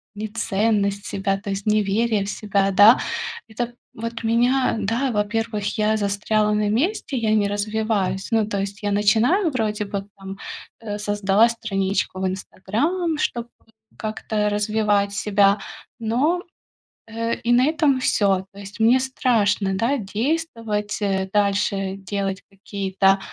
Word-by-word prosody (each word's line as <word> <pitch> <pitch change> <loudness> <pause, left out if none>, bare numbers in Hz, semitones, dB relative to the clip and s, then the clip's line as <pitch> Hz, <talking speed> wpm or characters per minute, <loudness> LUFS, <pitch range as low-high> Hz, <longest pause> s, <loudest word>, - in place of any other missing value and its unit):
Неценность 205 -1 0
себя, 195 0 -1
то 205 0 -7
есть, 195 0 -3
неверие 215 +1 +1
в 200 - -5
себя, 200 -2 0
да? 205 +5 +7 0.5
Это, 240 +2 -4 0.2
вот, 230 +1 -6
меня, 240 +3 +2
да, 230 +6 0
во-первых, 210 0 -1
я 215 0 +2
застряла 210 +1 +1
на 210 0 +1
месте, 280 - 0
я 220 -2 0
не 205 -1 +2
развиваюсь. 205 -2 -1
Ну, 220 -2 +3
то 200 -2 -2
есть, 200 +2 -5
я 205 - 0
начинаю 225 - +3
вроде 215 -4 -1
бы, 200 0 -4
там, 195 0 -8 0.4
э, 210 -2 -5
создала 205 +2 +3
страничку 195 -4 -2
в - - 0
Инстаграм, 295 - -2
чтобы 240 -4 -2 0.5
как-то 215 -1 -2
развивать 205 -1 +1
себя. 205 -1 +3 0.4
Но, 275 +11 +1 0.6
э, 230 +1 -2
и 235 - +1
на 250 +3 +5
этом 300 -4 +2
всё. 195 -6 +2
То 200 - -12
есть, 200 +3 -10
мне 235 +4 +5
страшно, 220 -7 +1
да, 235 +8 +1
действовать, 225 -2 -2
э, 190 -1 0
дальше. 200 -1 +1
Делать 195 0 -3
какие-то, 195 0 +1
210 Hz, 135 wpm, -22 LUFS, 200-230 Hz, 0.6 s, да